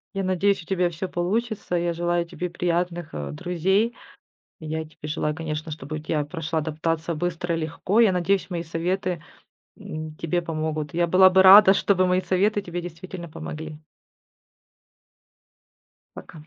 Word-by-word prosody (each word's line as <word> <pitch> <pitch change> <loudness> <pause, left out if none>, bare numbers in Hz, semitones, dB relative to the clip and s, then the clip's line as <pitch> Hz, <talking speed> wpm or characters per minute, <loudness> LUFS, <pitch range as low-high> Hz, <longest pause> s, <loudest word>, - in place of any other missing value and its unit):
Я 195 - -1
надеюсь, 185 0 +1
у - - -19
тебя 180 -1 +1
всё 175 +3 -5
получится. 200 +2 -1
И 170 - -1
я 170 - 0
желаю 175 0 0
тебе 175 +1 -5
приятных, 175 -1 -2
э, 70 -1 -4
друзей. 190 - 0 0.7
И 155 - -8
я 160 +1 -2
тебе 155 -1 -10
желаю, 150 0 -1
конечно, 155 -1 -4
чтобы 150 0 -6
у - - -3
тя 150 -1 -1
прошла 160 +1 -3
адаптация 160 +2 -2
быстро 175 +1 -2
и 165 - -1
легко. 165 +7 0
Я 225 -4 +6
надеюсь, 185 +2 0
мои 170 -2 -2
советы, 175 +1 -2 0.6
м, 155 0 -7
тебе 170 +2 -1
помогут. 155 -2 -3
Я 170 +1 +2
была 185 +2 +7
бы 190 0 +5
рада, 195 +1 +10
чтобы 185 -2 +2
мои 185 +1 +2
советы 205 +3 +1
тебе 175 -2 -5
действительно 175 0 -8
помогли. 155 0 -7 2.4
Пока. - - -11
175 Hz, 160 wpm, -24 LUFS, 160-185 Hz, 2.4 s, рада